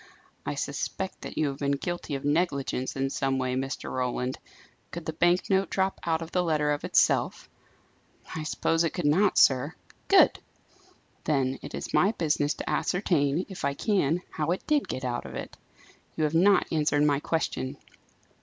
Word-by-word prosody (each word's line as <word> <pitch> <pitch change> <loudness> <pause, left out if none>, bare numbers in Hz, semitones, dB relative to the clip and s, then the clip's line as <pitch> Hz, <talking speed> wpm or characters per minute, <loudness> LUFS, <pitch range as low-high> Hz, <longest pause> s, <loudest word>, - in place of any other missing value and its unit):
"I - - -1
suspect 190 -1 -4
that - - -8
you 150 - +2
have 135 0 -7
been 140 0 +1
guilty 160 +1 -3
of 135 - -5
negligence 145 -4 0
in 135 0 -1
some 135 -1 0
way, 130 -1 -1
Mr. 135 +1 -3
Roland. 125 0 -2 0.5
Could 170 -1 -7
the 160 - -3
bank 175 +3 +2
note 195 0 +2
drop 190 0 0
out 165 -1 0
of 165 - -10
the 180 - +2
letter 155 -3 +1
of 145 - -2
itself?" - - +2 0.9
"I 160 - -3
suppose 165 +1 0
it 165 - -1
could 175 - -2
not, 185 +7 +3
sir." 135 +5 +4 0.3
"Good! 390 -2 +6 0.9
Then 135 -3 +1
it - - -7
is - - -6
my 200 +4 +4
business 150 -5 0
to - - -7
ascertain, 170 -3 +1
if 190 - -8
I 140 0 0
can, 180 -4 +1
how 155 0 -2
it 180 - -1
did 300 -2 +1
get 130 - -4
out 120 -1 -3
of - - -9
it. - - -6 0.6
You 160 - +1
have 150 0 +1
not 195 +5 +5
answered 150 -2 +2
my 145 -2 +3
question. 140 -4 -2
155 Hz, 180 wpm, -27 LUFS, 140-175 Hz, 0.9 s, Good